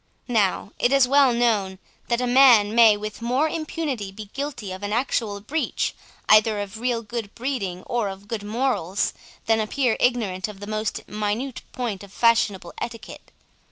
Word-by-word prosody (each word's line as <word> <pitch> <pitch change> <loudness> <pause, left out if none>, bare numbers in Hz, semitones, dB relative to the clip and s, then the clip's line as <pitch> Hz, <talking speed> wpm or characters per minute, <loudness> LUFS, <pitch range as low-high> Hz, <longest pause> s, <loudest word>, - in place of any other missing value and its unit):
Now, 210 -4 +1
it 245 - +2
is 275 -2 +5
well 275 -1 +5
known, 220 -6 +1 0.3
that 240 0 0
a - - +1
man 245 -5 +6
may 225 -3 +6
with 215 +1 -7
more 255 +6 +1
impunity 305 -10 -3
be 205 +1 -10
guilty 275 -8 -5
of 185 +1 -7
an 205 0 -4
actual 225 -3 -1
breach 300 +10 -2 0.3
either 215 0 +5
of 205 +2 -6
real 240 -1 -1
good 220 -1 -6
breeding 230 -8 -3
or 235 -4 -1
of 195 +1 -10
good 225 -1 -4
morals, 210 -4 -1 0.3
than 225 0 +3
appear 235 +2 +1
ignorant 220 -7 0
of 210 -2 -10
the 205 - -7
most 215 +1 -3
minute 215 +5 -3
point 225 -6 -4
of 200 - -13
fashionable 210 -6 +2
etiquette. 230 -2 -8
225 Hz, 165 wpm, -24 LUFS, 205-245 Hz, 0.3 s, man